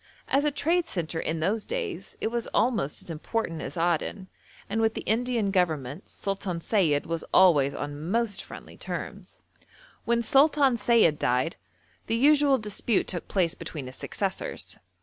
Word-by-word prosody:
As 280 +2 +2
a - - +4
trade 330 +4 +1
centre 165 - -3
in 160 0 -2
those 210 +6 0
days - - -4
it 220 - -1
was 235 -1 -2
almost 220 - +1
as - - -8
important 165 +1 -3
as - - -6
Aden, 175 +3 -1 0.4
and 220 +3 -1
with 220 0 +2
the - - -3
Indian 230 -2 0
Government 160 -4 -1
Sultan 195 -3 -3
Sayid 165 -6 +1
was 165 -1 -3
always 150 -7 +5
on 145 +3 -5
most 225 -1 0
friendly - - -11
terms. - - -7 0.6
When 235 0 +2
Sultan 275 +1 +4
Sayid 215 -9 +4
died, 125 +6 0 0.5
the 225 - +1
usual 285 +2 +5
dispute 215 -1 0
took 175 -3 -5
place 175 -4 +1
between 155 -4 -7
his 130 +1 -8
successors. - - -3
195 Hz, 155 wpm, -27 LUFS, 165-235 Hz, 0.6 s, always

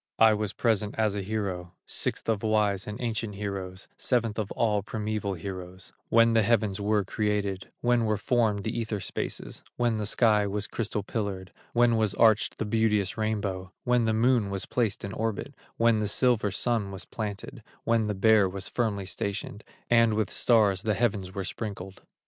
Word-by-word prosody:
I 110 -1 +6
was 105 -2 -1
present 110 -3 0
as 110 -2 +2
a 100 - -2
hero, 95 -4 -3
Sixth - - -2
of 110 -3 +1
wise 105 -3 +1
and 105 0 -6
ancient 110 -3 -2
heroes, 95 -2 -5
Seventh 115 -4 0
of 105 -2 -3
all 105 -3 +1
primeval 105 -1 -3
heroes, 95 0 -8 0.2
When 115 0 +5
the 115 - +5
heavens 105 -2 +1
were 105 0 +2
created, 100 -1 -2
When 120 -1 +2
were 110 -1 +1
formed 110 -2 +1
the 110 - -3
ether 110 -3 -2
spaces, - - -4 0.2
When 120 -2 +1
the 105 -1 -2
sky 105 -2 +3
was 100 +1 -2
crystal 105 -2 -3
pillared, 100 -3 -4 0.2
When 120 -1 +4
was 110 -2 +1
arched 110 -2 +4
the 110 - -2
beauteous 105 -3 +1
rainbow, 100 -4 -2
When 125 -1 +2
the 110 - +1
Moon 115 -2 +3
was 100 -1 -2
placed 115 -5 -1
in 100 - -6
orbit, 115 +6 -3 0.2
When 115 -1 +3
the 105 - 0
silver 115 -1 +3
Sun 110 0 0
was 95 -1 -6
planted, 110 +3 -6 0.2
When 115 -2 +2
the 105 - -1
Bear 105 -1 +4
was 95 +1 -5
firmly 105 -5 -1
stationed, 100 +3 -4 0.2
And 115 -2 +4
with 110 -1 0
stars 105 -5 +3
the 110 -1 0
heavens 100 -4 -1
were 100 - -2
sprinkled." 95 -2 -6
105 Hz, 180 wpm, -27 LUFS, 100-115 Hz, 0.2 s, I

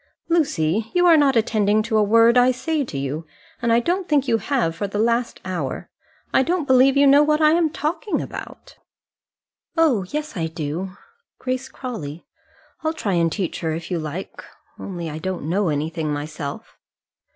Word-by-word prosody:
"Lucy, 225 - +1
you 355 0 +4
are 340 -2 +7
not 285 -4 +4
attending 215 -1 +2
to 225 0 -2
a 215 - +5
word 230 +3 +5
I 250 0 +6
say 295 +4 -1
to 165 - -6
you, 140 +4 -4 0.3
and 235 -1 +1
I 230 - +5
don't 355 +8 -1
think 285 -3 +2
you 225 -2 +2
have 220 - 0
for 205 - -3
the 200 - -5
last 235 +2 0
hour. 170 -8 -4 0.4
I - - +5
don't 340 +3 0
believe 260 +1 +5
you 285 - +6
know 280 +1 +7
what 300 0 +2
I 305 -1 +5
am 330 -1 +3
talking 330 +8 -2
about." - - -8 1.0
"Oh, 270 - +3
yes, 300 -3 -4
I 165 -3 -1
do 165 +4 -5 0.4
Grace 255 +1 -3
Crawley; 175 - -7 0.6
I'll 315 0 0
try 210 -11 -2
and 170 -1 +2
teach 190 -2 -3
her 160 -2 -2
if 165 +3 -6
you 175 - 0
like, 155 +4 -6 0.4
only 175 -4 -5
I 155 0 -5
don't 180 -3 -4
know 185 +2 +1
anything 155 +1 -2
myself." 145 -1 -6
220 Hz, 180 wpm, -22 LUFS, -, 1.0 s, are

